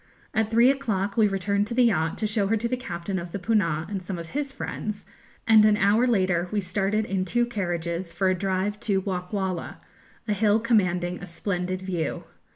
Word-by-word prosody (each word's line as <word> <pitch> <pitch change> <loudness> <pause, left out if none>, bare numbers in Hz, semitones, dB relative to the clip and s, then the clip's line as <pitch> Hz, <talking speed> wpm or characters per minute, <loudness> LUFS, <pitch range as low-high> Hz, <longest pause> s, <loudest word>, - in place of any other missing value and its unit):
At 220 -1 +1
three 235 +3 +5
o'clock 205 -8 -2
we 220 -2 +5
returned 200 +1 0
to 235 - -4
the 250 - +5
yacht, 165 -9 +1
to 220 - -1
show 210 -1 +1
her 225 +2 +2
to 235 +2 -1
the 255 - 0
captain 190 -5 -4
of 170 0 -7
the - - -3
'Poonah' 180 -6 +1
and 195 -2 -4
some 185 0 -5
of 165 -1 -7
his 280 0 -2
friends, 215 -6 -5 0.4
and 220 -1 +7
an 210 -1 +5
hour 210 +5 +3
later 185 -6 +2
we 210 - +1
started 200 +3 0
in 190 -3 -1
two 240 +6 +1
carriages 175 -5 -3
for 190 - 0
a 185 - +4
drive 190 +2 -1
to 200 -4 +1
Wockwalla, 185 -1 -3 0.5
a 210 - +1
hill 210 +1 +3
commanding 180 -6 +1
a - - -7
splendid 185 +1 -3
view. 180 -4 -2
200 Hz, 200 wpm, -25 LUFS, 180-220 Hz, 0.5 s, and